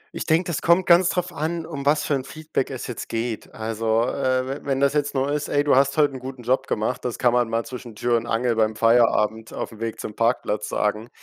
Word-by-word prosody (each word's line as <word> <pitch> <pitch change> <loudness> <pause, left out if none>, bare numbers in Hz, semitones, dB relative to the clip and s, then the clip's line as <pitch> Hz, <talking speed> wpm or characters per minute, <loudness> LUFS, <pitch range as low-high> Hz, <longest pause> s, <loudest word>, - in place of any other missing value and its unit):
Ich - - -4
denke, 165 +3 +3
das 170 -5 -2
kommt 170 +2 +4
ganz 175 +1 +5
drauf 180 -1 -2
an, 165 +2 -3
um 140 -4 -5
was 150 0 +3
für - - 0
'n 135 -2 0
Feedback 155 0 -3
es 130 -3 -6
jetzt 120 - -6
geht. 115 -1 -3
Also, 110 0 0
äh, 130 0 0
we 135 +2 -4
wenn 135 -1 -1
das 140 0 +3
jetzt 145 -1 -1
nur 135 +2 0
ist: 150 0 -1
„Ey, 145 - +2
du 145 - +3
hast 140 +2 +3
heute 145 -2 +3
'n 130 - -6
guten 130 -1 -8
Job 130 +3 +1
gemacht“, 110 +4 -2
das 125 - -3
kann 120 -2 +2
man 120 -2 +2
mal 115 0 -1
zwischen 120 -3 -9
Tür 120 +2 +1
und 115 0 -4
Angel 120 +1 +1
beim 110 -1 +1
Feierabend 110 -1 +2
aufm 110 - -6
Weg 115 -1 -4
zum 105 - -6
Parkplatz 115 -3 0
sagen. 105 +2 -1
130 Hz, 245 wpm, -23 LUFS, 115-145 Hz, -, ganz